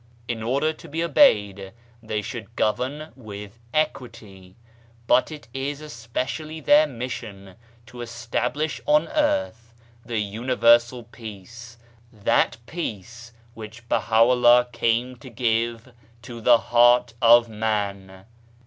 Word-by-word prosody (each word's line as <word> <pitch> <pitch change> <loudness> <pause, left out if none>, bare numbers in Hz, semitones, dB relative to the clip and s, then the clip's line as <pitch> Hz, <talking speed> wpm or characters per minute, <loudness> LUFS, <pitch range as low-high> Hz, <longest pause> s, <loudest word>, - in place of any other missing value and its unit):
In 115 -2 -4
order 140 +7 0
to - - -14
be 165 +3 -2
obeyed 100 - +3 0.3
they 110 -2 -4
should 115 0 -8
govern 130 +8 -2
with 105 -2 -10
equity: 115 -11 -4 0.5
but 130 - +3
it 150 -5 -10
is 140 +2 -4
especially 150 +3 -5
their 150 +1 +5
mission 115 -7 -7 0.3
to 120 +1 -11
establish 120 +6 -3
on 150 +2 +3
earth 290 - -1 0.3
the 115 -1 -4
Universal 120 +3 +2
Peace, 115 +1 -11 0.3
that 110 +1 +1
Peace 120 - -7 0.2
which 110 +1 -11
Baha'u'llah 120 +2 +4
came 115 +2 -1
to 130 +2 -12
give 115 0 -2 0.3
to 120 -2 -9
the 120 +1 +6
heart 120 +1 +3
of 120 0 +6
Man. 100 -4 -4
120 Hz, 110 wpm, -23 LUFS, 110-130 Hz, 0.5 s, the